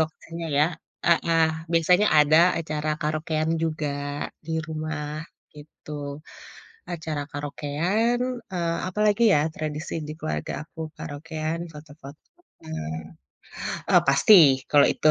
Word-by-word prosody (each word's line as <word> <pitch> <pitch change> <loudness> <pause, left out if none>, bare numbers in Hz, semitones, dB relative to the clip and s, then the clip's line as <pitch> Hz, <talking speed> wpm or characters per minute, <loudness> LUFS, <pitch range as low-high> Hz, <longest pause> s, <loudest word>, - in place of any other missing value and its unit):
lokasinya 165 +1 -4
ya. 150 - +6 0.4
Heeh. 165 -1 +3 0.3
Biasanya 180 +5 +4
ada 150 +1 +5 0.2
acara 155 -2 -3
karaokean 155 +1 -1
juga 155 -2 -1 0.6
di - - -6 0.2
rumah 155 -1 -4 0.5
gitu. 150 +1 -14 1.0
Acara 160 -3 -3
karaokean, 160 +11 -1 0.3
eee, 170 -2 -1
apa 185 +3 -4
lagi 210 +2 +2
ya - - +5 0.2
tradisi 155 +1 -4
di 150 - -5
keluarga 75 0 -3 0.2
aku, 160 - -12 0.2
karaokean, 155 +2 -4
foto-foto, 150 -1 -12 0.4
eee, 160 - -5 1.0
oh, - - +7
pasti 140 +10 +6 0.4
kalau 145 -1 +7
itu. - - +2
155 Hz, 110 wpm, -25 LUFS, 150-165 Hz, 1.0 s, oh